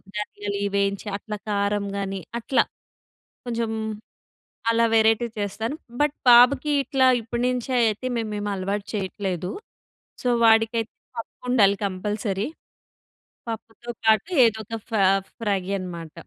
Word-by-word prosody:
ధనియాలు 205 Hz, -1 st, -4 dB
ఇవి 200 Hz, -, 0 dB
వేయించి 200 Hz, +1 st, 0 dB
అట్ల 210 Hz, +1 st, -8 dB, 0.2 s
కారం 200 Hz, 0 st, 0 dB
గాని 195 Hz, -1 st, -3 dB, 0.2 s
అట్లా. 260 Hz, +3 st, +2 dB, 0.8 s
కొంచెం 230 Hz, -2 st, -2 dB, 1.0 s
అలా 230 Hz, 0 st, +3 dB
వెరైటీ 225 Hz, +1 st, +4 dB
చేస్తాను. 215 Hz, +6 st, -2 dB, 0.3 s
బట్, 295 Hz, 0 st, +2 dB
బాబుకి 250 Hz, +4 st, +7 dB
ఇట్లా 270 Hz, -2 st, +2 dB
ఇప్పటినుంచే 245 Hz, +2 st, -1 dB
అయితే 220 Hz, +4 st, -1 dB
మేము 225 Hz, -2 st, -2 dB
ఏమి 205 Hz, 0 st, -2 dB
అలవాటు 195 Hz, +2 st, -3 dB
చేయట్లేదు. 190 Hz, -3 st, -3 dB, 0.7 s
సొ, 250 Hz, -, 0 dB, 0.2 s
వాడికై 225 Hz, +1 st, +4 dB, 0.4 s
పప్పు 230 Hz, -, -7 dB
ఉండాలి 200 Hz, -5 st, +5 dB
కంపల్సరీ. 200 Hz, +1 st, -2 dB, 1.0 s
పప్పుతో 225 Hz, +1 st, -7 dB
పాటు 220 Hz, +6 st, +4 dB, 0.2 s
ఏదో 220 Hz, -1 st, +1 dB
ఒక 225 Hz, +2 st, -4 dB
ఫా 215 Hz, -3 st, +3 dB, 0.4 s
ఫ్రై 205 Hz, -4 st, 0 dB, 0.2 s
అనమాట. 170 Hz, -3 st, -7 dB
215 Hz, 120 wpm, -24 LUFS, 200-230 Hz, 1.0 s, బాబుకి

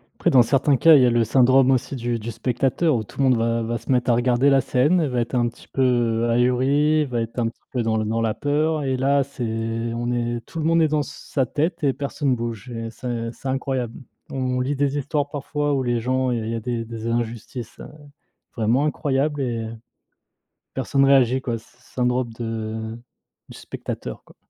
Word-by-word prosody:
Après -, -, +1 dB
dans 125 Hz, -2 st, +6 dB
certains 135 Hz, +2 st, +2 dB
cas, 165 Hz, +3 st, +7 dB
il 135 Hz, -, +6 dB
y -, -, +6 dB
a -, -, +4 dB
le 120 Hz, -1 st, +3 dB
syndrome 130 Hz, +3 st, +4 dB
aussi 130 Hz, +1 st, 0 dB
du 120 Hz, -1 st, -2 dB
du 115 Hz, +2 st, -5 dB
spectateur 130 Hz, +6 st, 0 dB
où 110 Hz, -, -1 dB
tout -, -, -16 dB
le 135 Hz, -, +1 dB
monde 125 Hz, -, +4 dB
va 115 Hz, 0 st, 0 dB
va 120 Hz, +1 st, -2 dB
se 115 Hz, +4 st, -5 dB
mettre 125 Hz, -1 st, +2 dB
à 115 Hz, -, +4 dB
regarder 125 Hz, +3 st, +3 dB
la 135 Hz, -1 st, +4 dB
scène, 145 Hz, +9 st, +2 dB
elle 150 Hz, -, 0 dB
va 125 Hz, -, -1 dB
être 120 Hz, +2 st, -2 dB
un 120 Hz, -1 st, +2 dB
petit 115 Hz, -, -17 dB
peu 120 Hz, -3 st, +1 dB
ahuri, 135 Hz, +6 st, +3 dB
il -, -, +1 dB
va 120 Hz, -2 st, -2 dB
être 115 Hz, +2 st, -4 dB
un 115 Hz, -, +1 dB
petit -, -, -18 dB
peu 125 Hz, -, -1 dB
dans 110 Hz, -1 st, 0 dB
le 110 Hz, -, 0 dB
dans 115 Hz, +1 st, -1 dB
la 110 Hz, -1 st, +1 dB
peur 150 Hz, +1 st, 0 dB
et 130 Hz, -1 st, 0 dB
là 140 Hz, +2 st, +2 dB
c'est 135 Hz, -2 st, -7 dB, 0.5 s
on 120 Hz, +1 st, -2 dB
est 120 Hz, -1 st, -1 dB
tout 165 Hz, -, -7 dB
le 155 Hz, -, -1 dB
monde 165 Hz, 0 st, +3 dB
est 160 Hz, -, +4 dB
dans 150 Hz, 0 st, +1 dB
sa 140 Hz, -2 st, -3 dB
tête 160 Hz, +6 st, -2 dB
et 135 Hz, -2 st, +3 dB
personne 140 Hz, -2 st, -1 dB
bouge 115 Hz, 0 st, -5 dB
et 115 Hz, -1 st, -5 dB
c'est 115 Hz, -2 st, -4 dB
c'est 135 Hz, -, -9 dB
incroyable. 130 Hz, -3 st, -2 dB, 0.4 s
On 130 Hz, -1 st, -1 dB
lit 135 Hz, +3 st, -1 dB
des 140 Hz, +1 st, 0 dB
histoires 145 Hz, +1 st, -1 dB
parfois 145 Hz, 0 st, -2 dB
où 135 Hz, -, +1 dB
les 120 Hz, -1 st, 0 dB
gens 130 Hz, +1 st, 0 dB
et 120 Hz, -, 0 dB
il 110 Hz, 0 st, -3 dB
y 115 Hz, -, -2 dB
a -, -, -2 dB
des 115 Hz, 0 st, -3 dB
des 115 Hz, 0 st, -6 dB
injustices, 120 Hz, 0 st, -4 dB
heu, -, -, -8 dB, 0.7 s
vraiment 120 Hz, +6 st, +2 dB
incroyables 145 Hz, 0 st, 0 dB
et 115 Hz, -3 st, -2 dB, 1.1 s
personne 135 Hz, 0 st, +1 dB
réagit, 130 Hz, -1 st, +4 dB
quoi! 120 Hz, -2 st, -2 dB
Syn 115 Hz, -, -19 dB, 0.2 s
syndrome 125 Hz, -1 st, 0 dB
de 110 Hz, -1 st, -4 dB, 0.5 s
du -, -, -11 dB
spectateur, -, -, -7 dB
quoi. -, -, -20 dB
125 Hz, 220 wpm, -23 LUFS, 115-140 Hz, 1.1 s, cas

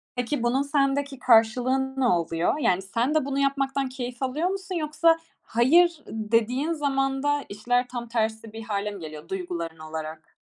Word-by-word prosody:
Peki, 245 Hz, +1 st, -2 dB
bunun 245 Hz, +3 st, +2 dB
sendeki 280 Hz, -1 st, 0 dB
karşılığı 255 Hz, +3 st, +3 dB
ne 260 Hz, -, +2 dB
oluyor? 170 Hz, -, +1 dB
Yani, 190 Hz, -8 st, +2 dB
sen 235 Hz, +10 st, -1 dB
de 310 Hz, -, +2 dB
bunu 275 Hz, 0 st, -2 dB
yapmaktan 275 Hz, -1 st, 0 dB
keyif 250 Hz, 0 st, -6 dB
alıyor 300 Hz, +7 st, 0 dB
musun? 380 Hz, -1 st, -4 dB
Yoksa, 325 Hz, +1 st, +3 dB, 0.2 s
"hayır" 315 Hz, +7 st, +3 dB
dediğin 230 Hz, +7 st, 0 dB
zaman 270 Hz, -2 st, 0 dB
da 290 Hz, 0 st, +1 dB
işler 245 Hz, +5 st, 0 dB
tam 240 Hz, -1 st, -6 dB
tersi 220 Hz, -1 st, -2 dB
bir 225 Hz, -, -7 dB
hâle 210 Hz, -1 st, -2 dB
mi 200 Hz, -, -8 dB
geliyor 155 Hz, -1 st, -9 dB
duyguların 170 Hz, -3 st, -4 dB
olarak? 155 Hz, 0 st, -7 dB
250 Hz, 160 wpm, -25 LUFS, 215-280 Hz, 0.2 s, karşılığı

